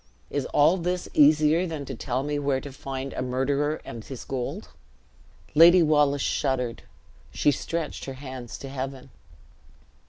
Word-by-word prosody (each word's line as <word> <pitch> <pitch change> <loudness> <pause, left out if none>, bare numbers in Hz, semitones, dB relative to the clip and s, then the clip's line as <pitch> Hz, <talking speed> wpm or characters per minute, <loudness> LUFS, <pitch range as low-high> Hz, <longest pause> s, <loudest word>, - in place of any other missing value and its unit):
Is 145 -2 -2
all 155 +5 +4
this 180 0 -2
easier 155 +4 +5
than 155 -4 -5
to 135 - -6
tell 125 +2 -2
me 145 0 -2
where 140 -2 0
to 140 - -9
find 135 0 -5
a - - -3
murderer 140 +4 0
and 115 -1 -8
his 130 0 -8
gold?" 130 -2 -4 0.8
Lady 170 +3 +8
Wallace 145 -2 +3
shuddered; 125 -3 -1 0.5
she 145 - +2
stretched 160 +3 -4
her 135 - -6
hands 130 -3 -8
to 135 - -8
heaven. 135 0 -6
140 Hz, 150 wpm, -26 LUFS, 130-150 Hz, 0.8 s, Lady